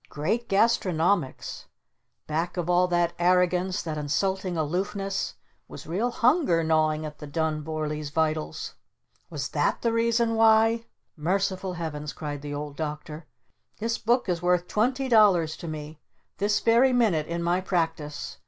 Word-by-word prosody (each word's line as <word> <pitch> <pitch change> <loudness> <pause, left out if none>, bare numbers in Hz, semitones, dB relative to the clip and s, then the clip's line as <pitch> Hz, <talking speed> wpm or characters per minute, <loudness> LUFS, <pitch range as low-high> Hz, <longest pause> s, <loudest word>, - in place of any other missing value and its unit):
Great 220 +11 -2
Gastronomics! 185 - +1 0.6
Back 165 +4 -2
of 175 -2 -2
all 180 +1 +4
that 175 -1 +1
arrogance, 180 +1 +2
that 155 -2 -4
insulting 185 +4 -1
aloofness, 190 +5 -2 0.3
was - - -10
real 195 +10 -1
Hunger 240 - +2
gnawing 155 -1 +1
at 150 -1 -8
the 150 - -8
Dun 155 +1 -1
Vorlees 155 -1 -3
vitals? 155 0 -2 0.6
Was - - -4
that - - 0
the 230 -1 +1
reason 230 0 +2
why? 225 +1 +4 0.3
Merciful 185 +3 -1
Heavens!" 150 -3 -5
cried 145 -2 -5
the 145 0 -6
Old 145 0 -5
Doctor. 155 0 -6 0.5
"This 230 +2 -2
book 240 +2 +1
is 175 -3 -1
worth 180 0 +1
twenty 255 +5 0
dollars 195 -9 +4
to 170 - -8
me 155 0 -7 0.4
this 205 +1 +1
very 240 +3 +4
minute 205 -11 +2
in 170 0 -3
my 175 +2 +1
Practice! 165 -5 -3
175 Hz, 145 wpm, -26 LUFS, 155-205 Hz, 0.6 s, all